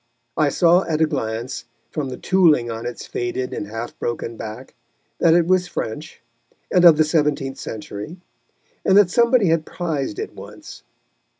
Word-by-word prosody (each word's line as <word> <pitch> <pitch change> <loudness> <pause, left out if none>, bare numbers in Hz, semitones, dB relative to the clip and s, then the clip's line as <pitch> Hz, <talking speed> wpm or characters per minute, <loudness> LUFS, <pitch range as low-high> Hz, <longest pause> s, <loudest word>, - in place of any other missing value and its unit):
I - - +2
saw 175 +1 +4
at 155 -2 -1
a 160 - +5
glance, 125 -4 -4 0.3
from 145 -4 -3
the 125 - -6
tooling 160 -11 +3
on 115 +1 -5
its 120 - -7
faded 120 +1 -3
and 105 - -4
half 115 +3 -6
broken 115 0 -3
back, 110 -1 -8 0.5
that 165 -1 +5
it 170 -1 +4
was 180 0 +2
French 150 +3 -6 0.5
and 180 -2 +4
of 165 -3 +8
the 155 - +5
seventeenth 150 -3 0
century, 110 - -7 0.7
and 190 - +4
that 200 -3 +5
somebody 235 -3 +4
had 165 -1 +2
prized 155 - -3
it - - -5
once. - - -11
150 Hz, 165 wpm, -21 LUFS, 120-175 Hz, 0.7 s, of